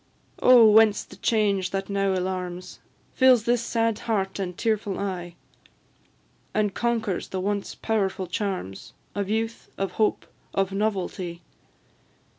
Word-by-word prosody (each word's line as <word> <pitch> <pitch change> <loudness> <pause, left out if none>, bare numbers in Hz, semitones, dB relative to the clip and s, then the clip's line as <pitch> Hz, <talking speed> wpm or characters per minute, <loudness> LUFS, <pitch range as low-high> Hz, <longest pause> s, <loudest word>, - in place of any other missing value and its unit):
Oh! 245 -3 +8
whence 215 -1 +5
the - - -14
change 200 -4 +1
that 195 0 -3
now 195 -1 0
alarms, 180 -1 -4 0.3
Fills 255 -4 +5
this 240 0 +2
sad 230 -2 0
heart 195 -4 -2
and 180 -2 -4
tearful 215 -4 -1
eye, 180 -3 -4 1.2
And 210 -2 +1
conquers 230 -5 -1
the 190 - -4
once 200 +1 -2
powerful 195 -4 -1
charms 180 - -4 0.2
Of 200 -1 -3
youth, 225 +1 -2
of 195 -1 -2
hope, 215 - +1 0.3
of 195 0 +1
novelty? 190 -4 -2
200 Hz, 125 wpm, -25 LUFS, 190-220 Hz, 1.2 s, Oh